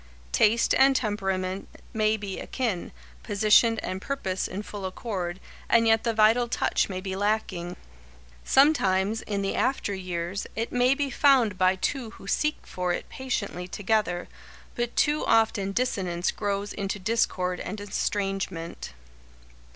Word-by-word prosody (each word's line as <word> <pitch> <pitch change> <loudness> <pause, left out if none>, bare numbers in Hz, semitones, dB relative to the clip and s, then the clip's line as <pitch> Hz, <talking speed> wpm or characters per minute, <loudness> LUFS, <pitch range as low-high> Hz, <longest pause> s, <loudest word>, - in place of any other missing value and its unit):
Taste 225 - +3
and 270 0 +6
temperament 195 -4 -1 0.3
may 215 0 +2
be 200 -2 -5
akin, 230 -9 -3 0.3
position 215 +2 +4
and 185 +1 -4
purpose 190 -9 -2
in 200 +3 -5
full 205 -2 -5
accord, 185 -3 -4 0.3
and 230 -1 +5
yet 225 0 +4
the 235 - +1
vital 225 +2 +4
touch 230 - 0
may 185 -1 -3
be 190 0 -4
lacking. 195 -4 -1 0.7
Sometimes, 220 -7 +3
in 200 -1 -3
the 195 - -1
after 260 -6 0
years, 185 0 -4
it 225 +1 -2
may 250 +2 +3
be 280 -1 -2
found 250 -7 +4
by 185 +1 +3
two 245 +4 -2
who - - -13
seek 300 +9 0
for 180 -1 -2
it - - -5
patiently 205 -8 -3
together, 205 -3 -1 0.5
but 240 0 -3
too 295 +1 +2
often 215 -3 +3
dissonance 190 -7 -1
grows 205 0 -2
into 200 0 -3
discord 185 -3 0
and 205 +3 -5
estrangement. 195 - -3
205 Hz, 140 wpm, -26 LUFS, 185-230 Hz, 0.7 s, and